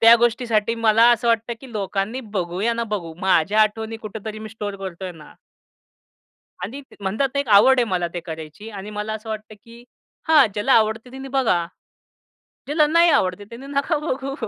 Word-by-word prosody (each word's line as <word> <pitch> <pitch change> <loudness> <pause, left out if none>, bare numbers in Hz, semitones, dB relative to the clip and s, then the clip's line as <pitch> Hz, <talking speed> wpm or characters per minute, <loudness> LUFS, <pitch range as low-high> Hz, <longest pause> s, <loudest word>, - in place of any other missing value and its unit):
त्या 230 +1 +9
गोष्टीसाठी 230 -1 +1
मला 225 0 +4
असं 235 +1 -1
वाटतं 230 +1 +1
की 265 -2 -12
लोकांनी 205 +4 -2 0.2
बघू, 175 0 -2
या 235 +2 +2
ना 235 0 -2
बघू. 170 -5 -5
माझ्या 190 +3 +3
आठवणी 220 +1 -2
कुठेतरी 215 0 -7
मी 215 0 -8
स्टोअर 205 -2 -6
करतो 190 -1 -7
आहे 180 - -5
ना. 155 -2 -14 1.3
आणि 260 +8 -6
त - - -16
म्हणतात 215 +8 0
ना 280 - +2
एक 270 - -5
आवड 260 +5 +6
आहे - - +3
मला 175 -2 0
ते 175 - -3
करायची. 160 +5 -9
आणि 205 0 -8
मला 210 +1 -4
असं 220 +1 -8
वाटतं 215 0 -6
की 235 +1 -15 0.4
हां, 300 -6 +7
ज्याला 210 +6 +1
आवडते 220 +2 +2
त्यांनी 265 +1 -8
बघा, 240 -11 +1 1.0
ज्याला 300 +1 +3
नाही 335 +2 +5
आवडते 185 -2 +1
त्याने 240 +4 -9
नका 280 +2 0
बघू. 275 -2 -3
220 Hz, 185 wpm, -22 LUFS, 200-250 Hz, 1.3 s, त्या